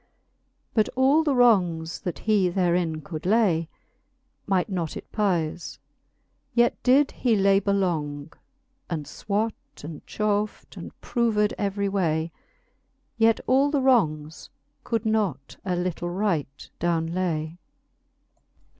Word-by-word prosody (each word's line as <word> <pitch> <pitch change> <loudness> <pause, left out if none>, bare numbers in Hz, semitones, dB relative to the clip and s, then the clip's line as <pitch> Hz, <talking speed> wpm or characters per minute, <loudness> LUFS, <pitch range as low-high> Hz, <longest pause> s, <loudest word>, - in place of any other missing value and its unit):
But 215 -2 +2
all 270 +5 +4
the 290 -4 +1
wrongs, 180 -9 +3
that 175 -6 -4
he 205 -2 +2
therein 175 -3 0
could 155 +1 -7
ky, 180 -5 +2 0.8
Might 190 -1 +1
not 175 -6 -3
it - - -11
peife; 175 -6 -1 0.8
yet 240 0 +2
did 275 +3 +4
he 240 -4 +1
labour 200 0 +3
long, 155 -6 -2 0.6
And 160 -4 -3
fwat, 210 +9 -2 0.3
and 150 0 -8
chauf 210 0 -1
'd, - - -14
and - - -10
proved 220 -4 +1
every 200 -1 -1
way; 165 -4 0 0.9
Yet 225 0 +4
all 270 +3 +3
the 285 -2 +1
wrongs 160 - +1 0.3
could 230 0 -2
not 200 -11 -1
a 185 -2 -1
litle 175 -1 -2
right 175 -8 -2
downe 165 -1 0
way. 170 -2 -2
190 Hz, 120 wpm, -25 LUFS, 165-220 Hz, 0.9 s, all